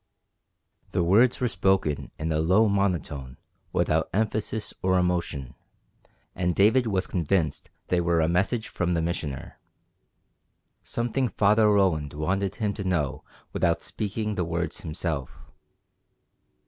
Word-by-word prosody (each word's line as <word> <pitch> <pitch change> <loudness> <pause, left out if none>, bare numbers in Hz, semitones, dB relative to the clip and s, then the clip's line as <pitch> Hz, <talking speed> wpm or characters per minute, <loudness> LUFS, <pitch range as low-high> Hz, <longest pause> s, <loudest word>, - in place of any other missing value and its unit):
The 85 - +2
words 110 +8 +4
were 125 - +1
spoken 95 -6 +1
in 80 +1 -2
a 75 - +1
low 95 +8 +4
monotone 85 -10 -1 0.3
without - - +1
emphasis 110 0 -1
or 95 0 +2
emotion, 85 -8 -1 0.8
and 90 -1 -1
David 115 +5 +4
was 95 -3 0
convinced 85 -2 -1 0.2
they 90 -1 +2
were 85 -1 +2
a 80 - +3
message 100 +7 +1
from 90 0 -1
the 85 - +1
Missioner, 75 -5 -4 1.2
something 120 +2 -1
Father 105 0 +3
Roland 90 -8 +2
wanted 95 +6 -1
him 105 -2 -1
to 100 - -5
know 85 -8 -1 0.3
without - - +1
speaking 105 +1 -3
the 90 - -1
words 85 +1 -3
himself. 80 -4 -4
90 Hz, 125 wpm, -26 LUFS, 80-105 Hz, 1.2 s, words